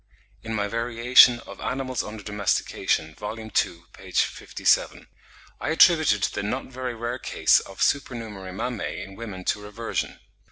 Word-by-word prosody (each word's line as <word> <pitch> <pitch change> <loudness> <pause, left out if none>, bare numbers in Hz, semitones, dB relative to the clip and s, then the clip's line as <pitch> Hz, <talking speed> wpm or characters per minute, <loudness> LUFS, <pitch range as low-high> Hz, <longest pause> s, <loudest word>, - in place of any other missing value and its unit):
In 110 0 -4
my 105 -1 0
'Variation 120 +2 +5
of - - -11
Animals 130 -1 -2
under 105 -1 -8
Domestication' 100 -6 -1
(vol. 105 +6 -6
ii. 110 0 -8
p. 85 0 -2
57), - - +1 0.5
I 135 - -3
attributed 160 - +5
the - - -1
not 105 +7 -3
very 130 -1 -5
rare 120 +2 -4
cases - - +3
of 95 - -3
supernumerary 110 -9 -2
mammae 115 +3 -4
in 95 - -11
women 100 -5 -7
to 105 - -1
reversion. 105 +3 -4
115 Hz, 145 wpm, -25 LUFS, 105-125 Hz, 0.5 s, Variation